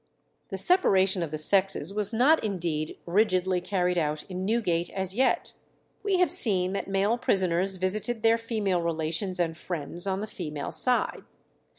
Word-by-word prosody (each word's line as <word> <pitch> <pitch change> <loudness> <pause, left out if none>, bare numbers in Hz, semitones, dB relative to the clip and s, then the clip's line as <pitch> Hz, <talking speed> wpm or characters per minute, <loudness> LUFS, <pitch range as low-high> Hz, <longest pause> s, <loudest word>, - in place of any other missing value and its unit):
The 195 - -5
separation 195 - +3
of 165 - -3
the 155 - -4
sexes 190 +1 0
was 210 0 +3
not 260 +8 +3
indeed 170 -7 -3
rigidly 185 -1 +1
carried 180 -1 0
out 150 -1 -2
in 185 0 -5
Newgate 185 -6 0
as 190 -1 -4
yet. 260 +5 0 0.5
We 400 -2 0
have 360 0 +3
seen 195 - +3
that 200 - -4
male 200 +4 0
prisoners 185 -1 +1
visited 215 +5 -1
their 225 0 +4
female 215 -6 -1
relations 170 +3 -2
and 165 -2 -1
friends 170 +2 -5
on 190 0 -1
the 210 - -3
female 150 -8 -6
side. 250 -1 +2
190 Hz, 160 wpm, -26 LUFS, 175-215 Hz, 0.5 s, their